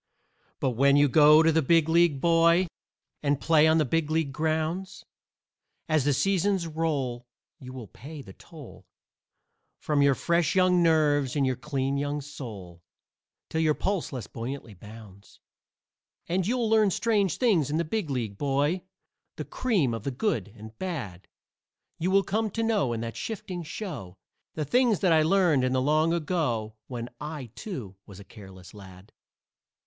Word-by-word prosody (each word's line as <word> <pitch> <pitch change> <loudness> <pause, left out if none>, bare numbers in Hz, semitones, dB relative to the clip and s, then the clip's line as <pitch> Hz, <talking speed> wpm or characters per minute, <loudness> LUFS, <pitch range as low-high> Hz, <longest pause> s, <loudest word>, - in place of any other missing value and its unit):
But 130 - 0
when 140 +4 +3
you 145 0 +5
go 150 +3 +6
to 165 - +4
the 160 +1 +2
Big 165 +2 +3
League, 165 -3 +3
boy, 170 +3 +4 0.6
And 145 -1 0
play 160 0 +4
on 160 0 +4
the 155 - +2
Big 160 +3 -1
League 155 -3 -1
grounds, 160 +5 -2 0.8
As 155 -4 +1
the 145 - +3
seasons 190 +4 +1
roll 145 -7 -2 0.3
you 130 -1 -10
will 130 -3 -8
pay 140 - -11
the 95 - -13
toll - - -14 0.9
From 150 -2 0
your 140 -1 +4
fresh 170 +3 0
young 185 -1 +4
nerves 150 -5 +2
and 140 -2 +2
your 130 -1 0
clean 135 0 -2
young 145 +1 -2
soul, 105 -12 -9 0.7
Till 160 - -2
your 155 -2 +2
pulse 195 -3 -2
less 125 -6 -5
buoyantly 120 -1 -7
bounds. 105 0 -14 0.9
And 180 +1 0
you'll 240 0 0
learn 220 -2 +4
strange 200 -2 0
things 195 - +2
in 150 - -1
the 170 - 0
Big 200 -1 -3
League, 115 -7 -3
boy, 145 +5 0 0.5
The - - -6
cream 190 - 0
of 115 - -4
the - - -2
good 125 - -1
and 110 +1 -11
bad; 125 - -5 0.7
You 175 - 0
will 195 +1 +4
come 215 +3 -1
to 225 +3 -3
know, 215 - +1
in 115 -1 -3
that 115 0 -5
shifting 190 -5 -5
show, 150 - -7 0.4
The 155 - -2
things 240 - +2
that 180 -4 +4
I 160 - +5
learned 165 -4 +3
in 130 0 0
the 130 - +2
long 155 +4 +2
ago 150 -10 -1
When 120 -2 -5
I, 150 -5 -7
too, 125 - -7
was 100 -1 -12
a - - -10
careless 95 -3 -14
lad. 95 -2 -14
150 Hz, 165 wpm, -27 LUFS, 125-170 Hz, 0.9 s, go